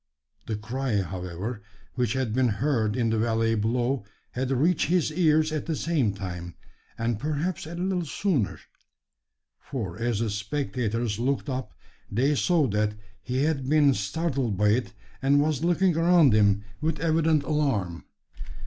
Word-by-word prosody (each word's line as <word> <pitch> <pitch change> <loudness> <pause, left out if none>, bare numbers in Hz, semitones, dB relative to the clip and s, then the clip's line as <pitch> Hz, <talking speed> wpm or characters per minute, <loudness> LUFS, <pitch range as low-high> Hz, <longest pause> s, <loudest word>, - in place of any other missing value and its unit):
The 110 - -1
cry, 110 0 -1
however, 90 +5 -5 0.3
which 125 -3 0
had 130 -4 -1
been 130 +1 +3
heard 115 -2 0
in 115 -3 +1
the 110 - +1
valley 115 0 +1
below 120 +3 0 0.3
had 130 +1 -2
reached 150 +6 +2
his 170 -2 +2
ears 155 -2 +3
at 155 0 -3
the 160 - 0
same 150 -10 +1
time, 90 -3 -6 0.4
and 115 -1 -1
perhaps 155 +4 -2
a 170 - -7
little 180 0 -1
sooner: 150 - -1 1.0
for 110 - -5
as 120 -2 0
the 115 -1 -1
spectators 115 -1 -2
looked 135 +3 -1
up, 130 -4 -4 0.3
they 130 +8 +2
saw 165 +1 +2
that 105 +1 0 0.3
he 125 +6 -1
had 140 -4 0
been 145 -2 +5
startled 125 - -1
by 105 +1 +3
it, 115 +2 0 0.3
and 140 +1 +4
was 150 0 +1
looking 175 0 +3
around 165 -5 +5
him 100 -1 +3 0.2
with 155 -1 -1
evident 160 -1 +2
alarm. 130 - -1
130 Hz, 150 wpm, -26 LUFS, 110-155 Hz, 1.0 s, been